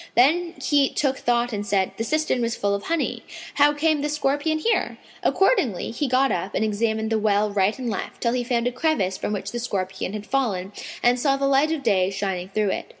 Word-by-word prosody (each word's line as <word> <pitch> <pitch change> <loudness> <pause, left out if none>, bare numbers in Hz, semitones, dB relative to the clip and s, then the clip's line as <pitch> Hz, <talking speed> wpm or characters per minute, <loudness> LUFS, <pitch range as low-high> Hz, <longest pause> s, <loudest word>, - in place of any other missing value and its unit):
Then 335 +7 +3
he 285 -2 +3
took 270 -2 0
thought 240 0 +1
and 205 -1 -2
said, 195 -2 0
"The 225 - -1
cistern 310 -1 0
was 230 0 -1
full 200 0 0
of 200 0 -3
honey; 330 -1 -1 0.3
how 290 0 +5
came 300 0 +1
this 295 +1 -1
scorpion 300 +2 0
here?" 450 +9 0 0.2
Accordingly 305 - +1
he 280 +5 -2
got 260 +2 +2
up 185 +3 -3
and 220 - +1
examined 220 +1 -1
the 220 - +2
well 210 0 +2
right 200 +1 +1
and 255 -2 -5
left, 215 -4 -4
till 235 -1 +1
he 250 -1 0
found 240 -1 0
a 245 - +1
crevice 250 - 0
from - - -3
which 200 -1 -3
the 240 - -4
scorpion 190 -4 -3
had 210 -1 -5
fallen 205 -8 -1 0.3
and 245 +1 +4
saw 275 +1 +2
the 275 - 0
light 275 +3 +3
of 315 -4 -2
day 190 -5 +2
shining 190 -2 -3
through 205 0 0
it. - - -4
240 Hz, 220 wpm, -23 LUFS, 205-285 Hz, 0.3 s, how